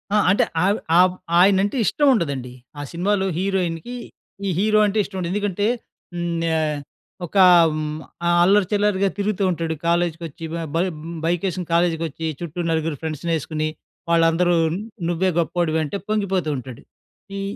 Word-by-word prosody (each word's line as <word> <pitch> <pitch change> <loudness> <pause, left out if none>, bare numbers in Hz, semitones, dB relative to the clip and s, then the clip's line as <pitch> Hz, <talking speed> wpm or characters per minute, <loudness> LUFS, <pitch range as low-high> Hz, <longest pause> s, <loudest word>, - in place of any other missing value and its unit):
ఆహ్, 210 - +4
అంటే 200 - +4 0.2
ఆవ్ 200 +3 +2 0.2
ఆ - - +7 0.4
ఆయన 190 +1 +5
అంటే 205 +6 -1
ఇష్టం 290 +7 +2
ఉండదండి. 140 - -2 0.3
ఆ - - -4
సినిమాలో 190 +3 0
హీరోయిన్‌కి, 185 +3 -2 0.5
ఈ - - +1
హీరో 215 +1 +3
అంటే 205 +1 -1
ఇష్టం 190 -1 -8
ఉండదు. 175 -1 -3
ఎందుకంటే 205 0 0 0.5
హ్మ్, 170 -1 -2 0.2
ఆహ్, 155 -2 -1 0.5
ఒకా 190 +3 +4 0.3
హ్మ్, 155 0 -3 0.3
ఆహ్, 175 - +3
అల్లరి 195 0 +4
చిల్లరిగా 205 -1 +2
తిరుగుతూ 200 -1 -1
ఉంటాడు. 165 -1 -2
కాలేజ్‌కొచ్చి 170 -2 -1
బ - - -2 0.2
బ - - +2 0.5
బైక్ 175 +2 0
ఏసుకొని 180 -1 -5
కాలేజీకొచ్చి 165 -2 0
చుట్టూ 175 0 -5
4 160 -2 -1
ఫ్రెండ్స్‌నేసుకొని, 155 0 -2 0.4
వాళ్ళందరూ 170 +1 +3 0.5
నువ్వే 180 +2 +1
గొప్పోడివి 165 -1 0
అంటే, 155 +7 -3
పొంగిపోతూ 195 -6 0
ఉంటాడు. 125 -1 -9 0.6
ఈ, - - -3
175 Hz, 145 wpm, -22 LUFS, 160-195 Hz, 0.6 s, ఆ